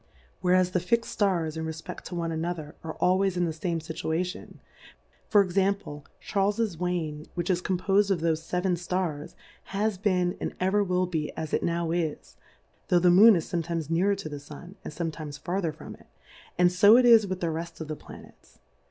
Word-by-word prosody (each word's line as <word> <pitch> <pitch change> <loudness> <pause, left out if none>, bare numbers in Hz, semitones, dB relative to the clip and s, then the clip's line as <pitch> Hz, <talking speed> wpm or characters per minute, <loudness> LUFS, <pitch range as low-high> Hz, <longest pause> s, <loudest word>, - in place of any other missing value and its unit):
Whereas 180 0 +3
the 180 - +1
fix'd 230 +7 0
Stars 175 -7 0
in 160 - -4
refpe£t 160 0 -7
to 180 - -6
one 165 -1 -2
another, 160 -2 -4
are 160 -1 -6
always 185 0 +2
in 175 - +2
the 165 - -2
fame 170 +1 -2
Scittiation: 165 +2 -4 0.7
For 205 - +6
Example, 190 -5 -1 0.2
CAi^r/fj's 200 -2 0
Wain 160 -4 -3
which 175 +1 -1
is 175 -1 0
composed 195 +2 +1
of 185 -4 +1
thofe 160 -1 +1
feven 180 -1 0
Stars, 180 -5 -3 0.3
has 200 0 -1
been 180 -3 +1
and - - -3
ever 190 +3 +2
will 180 -1 +1
be 160 -4 -3
as 155 - -5
it - - +2
now 170 -1 -1
is, 165 -3 -3 0.5
tho' 180 - +4
the 175 +1 +4
MooTi 205 +5 +8
is 165 - -1
fometimes 165 -2 -2
nearer 190 +5 +2
to 195 -4 -7
the 145 -1 -6
Sim^ 150 +5 -11
and - - -6
fometimes 155 -2 -5
farther 175 -2 -2
from 155 - -10
it, - - -18 0.5
and 180 0 +4
fo 205 +5 +7
it 250 - +4
is 225 -3 +7
with 185 -1 -3
the 170 -2 -1
reft 165 +1 -6
of 160 - -6
the 155 - -4
Planets. - - -15
175 Hz, 190 wpm, -27 LUFS, 160-190 Hz, 0.7 s, MooTi